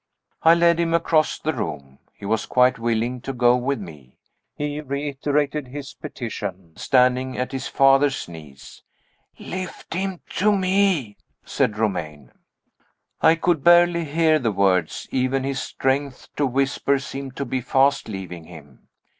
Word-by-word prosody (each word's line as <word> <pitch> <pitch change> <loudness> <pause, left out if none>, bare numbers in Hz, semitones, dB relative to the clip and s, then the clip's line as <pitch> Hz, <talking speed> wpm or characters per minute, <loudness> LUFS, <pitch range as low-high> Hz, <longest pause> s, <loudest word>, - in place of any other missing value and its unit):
I 165 +1 +6
led 170 0 +3
him 165 -1 +1
across 160 -2 +2
the 155 - -2
room. 70 - -6 0.2
He - - -11
was 110 +2 -1
quite 125 -1 +3
willing 120 +2 -1
to 135 - -4
go 120 -1 +4
with 130 +1 -1
me 75 -9 -12 0.4
he 145 0 -3
reiterated 145 0 -2
his 135 +1 -8
petition, 95 -7 -7
standing 130 0 +2
at 125 - -2
his 135 0 -4
father's 135 0 +3
knees. 75 -5 -12 0.6
"Lift 185 -2 -7
him 190 0 -3 0.2
to 205 +1 +3
me," 185 - +1 0.3
said 105 - 0
Romayne. 80 - -3 0.9
I 160 - +6
could 165 -3 0
barely 175 -1 +5
hear 155 +1 +2
the 115 -5 0
words: 90 -4 +1
even 130 +1 0
his 135 0 -2
strength 135 0 -2
to 145 - +1
whisper 135 +2 +1
seemed 135 -1 -7
to 140 - -3
be 130 +1 -2
fast 135 +1 +2
leaving 90 -5 -7
him. 75 -6 -15
135 Hz, 145 wpm, -22 LUFS, 110-150 Hz, 0.9 s, I